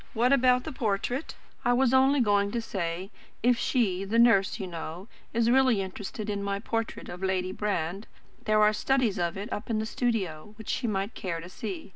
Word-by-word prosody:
What 245 +4 +4
about 250 -2 +4
the 315 - -5
portrait?" 245 +3 -2 0.3
"I 245 - +3
was 260 0 +3
only 265 +1 +5
going 205 -2 +3
to 235 - 0
say, 185 -3 -4 0.3
if 245 +1 +5
she 195 -7 +1
the 205 +4 -1
nurse, 230 -3 +4
you 195 - -3
know 170 +2 -7 0.2
is 230 +1 +2
really 260 -4 +4
interested 195 +2 -5
in 205 -1 -2
my 200 0 -1
portrait 225 +2 -3
of 180 +1 -8
Lady 185 -1 0
Brand, 195 -1 -2 0.4
there 215 0 +4
are 210 0 +5
studies 240 -4 +1
of 170 +1 -1
it 205 +5 -5
up 205 - -5
in 225 - +1
the 215 - -1
studio, 210 -6 -2
which 220 - -9
she 250 - -1
might 200 +1 -1
care 170 -3 -4
to 170 +2 -9
see. 190 -1 -6
210 Hz, 200 wpm, -28 LUFS, 190-240 Hz, 0.4 s, only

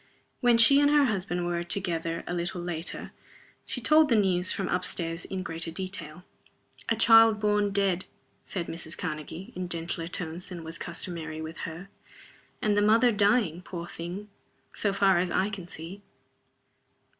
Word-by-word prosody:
When 240 -2 +4
she 275 +5 +7
and 285 0 +4
her 295 -1 +5
husband 185 -6 -1
were 175 0 -1
together, 170 -2 -2
a - - -4
little 175 +1 -2
later, 175 -1 -5 0.6
she - - -2
told 310 0 +5
the 235 - +4
news 185 -3 +2
from 195 -3 -2
up 180 +1 0
stairs 165 -1 -1
in 190 -1 -4
greater 165 -1 -3
detail. 180 -2 -6 0.7
"A 225 - +3
child 225 -1 +6
born 210 -1 +2
dead," 195 -2 +1 0.4
said 180 -3 -4
Mrs. 165 0 -5
Karnegie, 165 +6 -6
in 180 -1 -4
gentler 165 0 -4
tones 175 0 -4
than 175 -3 -7
were 160 - -7
customary 165 -1 -4
with 160 +1 -7
her. 170 +4 -9 0.8
"And 210 -2 +2
the 205 - +3
mother 225 +4 +5
dying, 205 -5 +2
poor 175 -2 -7
thing, 175 +4 -7 0.5
so 205 - 0
far 195 -2 +3
as 180 0 0
I 195 +4 0
can 190 -4 -7
see." 175 +4 -9
180 Hz, 165 wpm, -28 LUFS, 170-205 Hz, 0.8 s, she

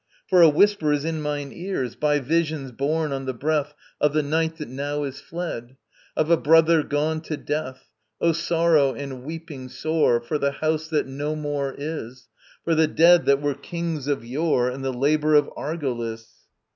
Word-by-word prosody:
For 185 -3 +5
a 165 - +9
whisper 165 0 +3
is 145 0 0
in 160 -1 -2
mine 145 -2 -3
ears, 170 - -4
By 150 -1 +2
visions 155 -1 -1
borne 150 +5 -1
on 135 -1 -3
the 130 -1 -3
breath 150 +2 -1 0.2
Of 150 -1 +2
the 155 0 +2
Night 160 +2 0
that 150 - -6
now 145 +3 -3
is 140 0 -6
fled, 135 -7 -6 0.4
Of 155 +2 +1
a 170 - +6
brother 165 +1 +5
gone 155 +2 -1
to 155 -2 -5
death. 145 -3 -5 0.3
Oh 170 - +3
sorrow 165 -4 +2
and 135 -2 -6
weeping 150 -3 -8
sore, 155 -5 +1
For 135 +6 -3
the 140 0 0
house 155 +1 -1
that 155 -2 0
no 145 +3 -3
more 145 -2 -3
is, 140 -5 -6 0.3
For 165 - +1
the 160 0 +4
dead 170 +2 +5
that 140 +1 +3
were 145 -1 +1
kings 160 0 -4
of 140 -5 -1
yore 130 -1 +1
And 135 +1 -7
the 135 - -1
labour 150 +4 +2
of 145 -1 +4
Argolis! 115 -7 -5
150 Hz, 185 wpm, -24 LUFS, 135-160 Hz, 0.4 s, a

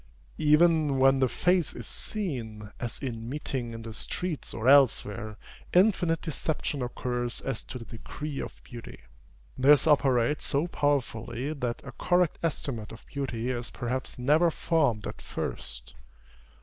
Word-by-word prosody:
Even 155 -2 +4
when 135 0 +5
the 130 -1 +3
face 180 +2 +2
is - - -6
seen, 115 - -3
as 120 -2 -3
in 115 -3 -4
meeting 130 -4 -3
in 115 0 -7
the 115 0 -7
streets 170 - -4
or 115 +2 -3
elsewhere, 110 -6 +4 0.4
infinite 180 -4 +4
deception 155 -2 -2
occurs 120 0 -2
as 135 -5 -4
to 130 - -7
the 115 - -9
degree 140 +6 -6
of - - -7
beauty. 120 -1 -10 0.6
This 145 +2 +6
operates 140 -2 +3
so 140 +4 +1
powerfully, 140 -4 -1
that 125 -5 -3
a - - -7
correct 180 -2 +1
estimate 135 -9 -2
of 115 - -12
beauty 130 -3 -3
is 120 -1 -4
perhaps 130 +1 -3
never 150 +7 +4
formed 140 -11 +1
at - - -6
first. - - -6
135 Hz, 140 wpm, -28 LUFS, 115-150 Hz, 0.6 s, This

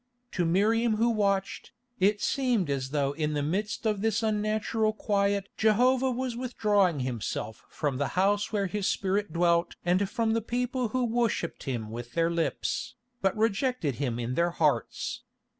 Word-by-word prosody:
To 175 - 0
Miriam 215 +6 +2
who 230 +2 +2
watched, 200 -3 -1 0.3
it 205 +2 +3
seemed 240 - +1
as 130 -1 -2
though 140 -1 0
in 150 +1 -2
the 145 -1 -1
midst 205 +9 -2
of 210 -2 +1
this 225 +1 +1
unnatural 215 0 0
quiet 200 -2 0
Jehovah 250 +4 +3
was 255 -1 -2
withdrawing 205 - +1
Himself 115 -3 -4
from 145 -4 -2
the 140 - +1
house 205 +2 +2
where 205 -2 0
His 195 +1 -2
Spirit 200 +1 0
dwelt 170 0 +2
and 185 +3 +2
from 230 -2 0
the 230 - +1
people 245 +2 -1
who 250 +3 0
worshipped 230 -7 -1
Him 115 -6 -3
with 120 +1 -7
their 165 0 +2
lips, 170 -1 -2 0.3
but 195 +1 +1
rejected 220 - 0
Him 125 -5 -1
in 120 +1 -3
their 170 +5 +2
hearts. 155 -4 -1
200 Hz, 160 wpm, -28 LUFS, 165-225 Hz, 0.3 s, it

